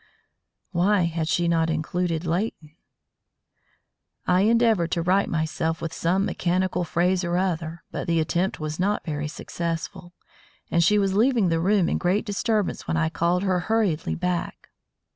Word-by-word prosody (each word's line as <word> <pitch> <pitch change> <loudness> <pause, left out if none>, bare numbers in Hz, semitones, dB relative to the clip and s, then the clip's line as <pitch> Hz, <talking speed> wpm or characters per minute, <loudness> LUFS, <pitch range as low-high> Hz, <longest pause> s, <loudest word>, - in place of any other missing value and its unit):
Why 190 +3 +2
had 165 -1 -1
she 175 -1 +1
not 165 -1 +2
included 165 +1 -1
Leighton? 165 -3 -3 1.5
I 180 +1 +3
endeavoured 225 -5 +3
to 170 - 0
right 190 +3 +2
myself 160 0 -1
with 165 -1 -5
some 185 +4 +1
mechanical 180 -1 0
phrase 180 +2 +1
or 175 0 0
other, 170 -3 -2
but - - -4
the 165 -1 +2
attempt 175 +4 0
was 155 +1 -4
not 205 +3 0
very 150 -2 -3
successful, 170 +2 -5 0.6
and 170 0 +3
she 210 +5 +4
was 195 -2 +1
leaving 225 -2 +3
the 165 0 +1
room 190 +1 +2
in - - 0
great 185 +4 +1
disturbance 210 0 -1
when 160 - 0
I 160 -1 +1
called 170 +4 0
her 185 -2 +1
hurriedly 195 -4 0
back. 180 -1 -3
175 Hz, 155 wpm, -24 LUFS, 165-190 Hz, 1.5 s, she